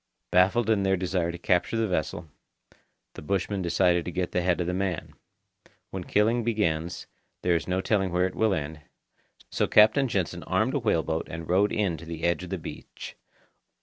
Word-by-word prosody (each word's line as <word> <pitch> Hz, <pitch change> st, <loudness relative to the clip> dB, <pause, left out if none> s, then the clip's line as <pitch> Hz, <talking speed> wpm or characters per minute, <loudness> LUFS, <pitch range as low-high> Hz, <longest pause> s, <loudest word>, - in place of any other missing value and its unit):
Baffled 100 Hz, +6 st, +4 dB
in 110 Hz, -3 st, +3 dB
their 95 Hz, 0 st, +2 dB
desire 90 Hz, -1 st, -1 dB
to 85 Hz, -, -7 dB
capture 90 Hz, +5 st, +1 dB
the 115 Hz, -1 st, +1 dB
vessel, 90 Hz, -3 st, -2 dB, 0.9 s
the -, -, -9 dB
bushmen 95 Hz, +4 st, -1 dB
decided 90 Hz, 0 st, +2 dB
to 90 Hz, -, -4 dB
get 90 Hz, 0 st, -2 dB
the 90 Hz, -, 0 dB
head 90 Hz, 0 st, +1 dB
of 90 Hz, -, 0 dB
the 90 Hz, -, -2 dB
man. 95 Hz, -3 st, -2 dB, 0.8 s
When 95 Hz, -2 st, -5 dB
killing 115 Hz, +3 st, +2 dB
begins, 90 Hz, -7 st, -1 dB, 0.4 s
there 90 Hz, -, +3 dB
is 85 Hz, -, -2 dB
no 90 Hz, +1 st, 0 dB
telling 95 Hz, -3 st, +1 dB
where 90 Hz, +1 st, +2 dB
it 95 Hz, -, -3 dB
will 110 Hz, -3 st, +2 dB
end, 75 Hz, 0 st, -5 dB, 0.7 s
so -, -, +1 dB
Captain 110 Hz, +6 st, +5 dB
Jansen 95 Hz, -8 st, -2 dB
armed -, -, +1 dB
a -, -, +1 dB
whale -, -, +1 dB
boat 80 Hz, 0 st, -2 dB
and 80 Hz, 0 st, -6 dB
rowed 100 Hz, +4 st, +3 dB
in 95 Hz, -6 st, 0 dB
to 85 Hz, -, -11 dB
the 80 Hz, -1 st, -6 dB
edge 85 Hz, -1 st, +1 dB
of 90 Hz, -, -8 dB
the 95 Hz, -, -2 dB
beach. 80 Hz, -, -9 dB
90 Hz, 195 wpm, -27 LUFS, 85-100 Hz, 0.9 s, Captain